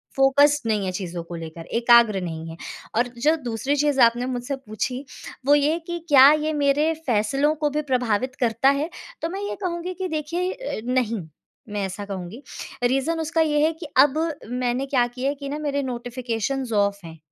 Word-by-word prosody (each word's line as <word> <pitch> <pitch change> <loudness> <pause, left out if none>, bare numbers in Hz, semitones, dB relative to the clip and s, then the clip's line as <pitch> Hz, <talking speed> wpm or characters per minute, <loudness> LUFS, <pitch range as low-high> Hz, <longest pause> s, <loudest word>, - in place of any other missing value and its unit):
Focused 285 0 +4
नहीं 210 -3 +1
है 185 - -1
चीज़ों 180 -2 -5
को 170 0 -8
लेकर, 165 0 -8
एकाग्र 235 -4 +4
नहीं 165 -2 -5
है। 165 - -9 0.4
और 240 +2 +2 0.2
जो 310 +2 +5
दूसरी 245 +5 -1
चीज़ 290 -2 +1
आपने 235 +1 +4
मुझसे 255 +2 -3
पूछी, 260 +2 -4 0.4
वो 290 +1 +6
ये 290 +1 +3
है 335 - -1
कि 345 0 -3
क्या 275 0 +9
ये 310 0 0
मेरे 295 +2 +2
फैसलों 270 +7 +2
को 300 -1 0
भी 300 +1 -1
प्रभावित 250 0 0
करता 235 +2 +3
है? 285 +4 0 0.3
तो 325 - -1
मैं 390 +3 -5
ये - - -3
कहूँगी 350 +1 -3
कि 370 0 -4
देखिए, 335 +4 -2
अ, - - -5
नहीं, 240 -5 0 0.5
मैं 205 -1 -2
ऐसा 195 +2 -6
कहूँगी। 195 +5 -7 0.4
रीजन 270 +6 +1
उसका 325 +1 0
ये 295 -2 +2
है 320 - +2
कि 320 0 -9
अब 285 +2 +6 0.3
मैंने 250 +1 -1
क्या 255 -3 +2
किया 255 +3 -3
है 290 - -2
कि 280 0 -7
ना 295 - -3
मेरे 285 -2 -1
नोटिफ़िकेशंस 245 0 -3
ऑफ़ 200 -1 +2
हैं, 165 0 -10
260 Hz, 195 wpm, -23 LUFS, 225-295 Hz, 0.5 s, क्या